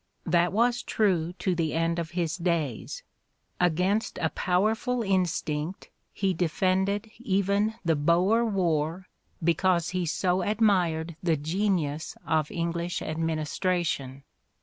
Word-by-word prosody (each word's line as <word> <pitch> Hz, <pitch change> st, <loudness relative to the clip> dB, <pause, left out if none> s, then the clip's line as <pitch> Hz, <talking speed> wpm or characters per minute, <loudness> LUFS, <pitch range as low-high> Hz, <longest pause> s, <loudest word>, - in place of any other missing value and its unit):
That 170 Hz, +1 st, +3 dB
was 240 Hz, +4 st, +2 dB
true 180 Hz, -8 st, +1 dB
to 185 Hz, 0 st, -1 dB
the 165 Hz, -3 st, -1 dB
end 165 Hz, +1 st, +1 dB
of 165 Hz, -1 st, -3 dB
his 170 Hz, -2 st, 0 dB
days; 170 Hz, -, -2 dB, 0.6 s
against 180 Hz, +5 st, +1 dB
a 160 Hz, -, 0 dB
powerful 220 Hz, +6 st, +1 dB
instinct 180 Hz, -3 st, -1 dB, 0.2 s
he 195 Hz, -2 st, 0 dB
defended 190 Hz, +5 st, 0 dB
even 200 Hz, 0 st, +1 dB
the 165 Hz, -1 st, +3 dB
Boer 175 Hz, +10 st, +3 dB
War 175 Hz, -4 st, 0 dB, 0.4 s
because 170 Hz, +1 st, +2 dB
he 180 Hz, -2 st, -1 dB
so 180 Hz, +3 st, +1 dB
admired 180 Hz, -7 st, +1 dB
the 165 Hz, -3 st, +1 dB
genius 160 Hz, -1 st, -1 dB
of 155 Hz, -2 st, +1 dB
English 170 Hz, +1 st, -2 dB
administration. 155 Hz, -3 st, -2 dB
175 Hz, 115 wpm, -27 LUFS, 160-195 Hz, 0.6 s, That